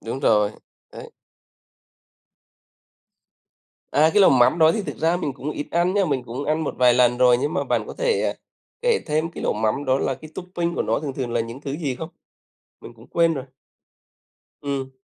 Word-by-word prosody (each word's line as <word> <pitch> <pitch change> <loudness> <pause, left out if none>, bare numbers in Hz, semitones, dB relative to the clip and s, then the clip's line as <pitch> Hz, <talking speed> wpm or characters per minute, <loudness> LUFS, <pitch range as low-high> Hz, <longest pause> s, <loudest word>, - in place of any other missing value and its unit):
Đúng 125 +4 -5
rồi. 105 -2 +3 0.4
Đấy. - - -10 2.8
À, 155 +3 +4
cái 205 - +5
lẩu 190 - +7
mắm 125 +5 +4
đó 160 0 +6
thì 210 - -2
thực - - -6
ra 165 +2 +2
mình 150 -6 -3
cũng 140 +3 -6
ít 145 - -5
ăn 175 +2 +1
nhá, 200 -2 +3
mình 140 -6 -1
cũng 125 +4 -5
ăn 155 +1 0
một - - -3
vài 125 -1 +5
lần 125 0 +3
rồi, 125 -1 +5
nhưng 145 +3 -1
mà - - 0
bạn - - -1
có - - -7
thể, - - 0
à, - - -1 0.5
kể 480 -2 +3
thêm 155 +1 0
cái - - -8
lẩu - - +1
mắm 110 +6 -1
đó 130 +1 +2
là 135 - -1
cái 155 +3 -13
topping 175 -2 -3
của - - 0
nó - - 0
thường 145 -3 -4
thường 125 -3 -4
là 120 - +1
những 115 +3 -6
thứ 140 -1 -5
gì 145 -5 -2
không? 160 +5 -7 0.7
Mình - - -11
cũng 115 +1 -18
quên 165 -1 +2
rồi. 135 -3 -5 1.2
Ừm. 140 -2 -3
145 Hz, 205 wpm, -23 LUFS, 125-165 Hz, 2.8 s, lẩu